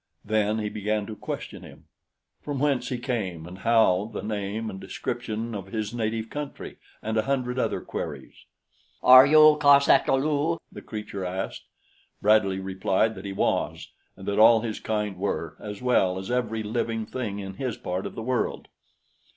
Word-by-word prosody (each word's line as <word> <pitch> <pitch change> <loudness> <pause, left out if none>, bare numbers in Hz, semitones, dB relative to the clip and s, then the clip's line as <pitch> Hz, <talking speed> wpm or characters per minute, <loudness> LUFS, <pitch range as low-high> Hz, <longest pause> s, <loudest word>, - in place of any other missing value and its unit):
Then 110 0 +1
he 105 -1 -2
began 105 0 -2
to 110 - -7
question - - -6
him - - -14 0.6
from 145 -2 -4
whence 135 -3 0
he 125 - -2
came 100 -10 -3
and 90 +2 -10
how, 110 -3 +3
the - - -5
name 105 +1 -3
and 95 -3 -6
description 115 -1 -4
of 100 -2 -6
his 110 +1 -4
native 110 -1 -2
country, 145 -1 -6 0.3
and 110 +1 -2
a - - +4
hundred 125 +1 -1
other - - -1
queries. - - -6 0.7
"Are 130 +2 +9
you 155 0 +7
cos 140 -1 +6
ata - - +5
lu?" 150 +4 0
the - - -9
creature 105 -3 -6
asked. 95 +1 -4 0.5
Bradley 100 -2 +3
replied 95 +3 0
that 95 -1 -10
he 100 - -4
was - - -1 0.3
and 95 - -10
that 100 +1 0
all 115 0 +7
his 110 -2 -4
kind 105 -3 -2
were, 85 -5 -3
as 105 +2 -8
well 95 -7 +2
as 95 +4 -5
every 115 -3 -1
living 115 +1 -2
thing 105 -3 -4
in 95 -1 -6
his 125 +1 -4
part 90 +1 -3
of - - -10
the 115 - -5
world. 125 0 -2
110 Hz, 175 wpm, -26 LUFS, 100-125 Hz, 0.7 s, Are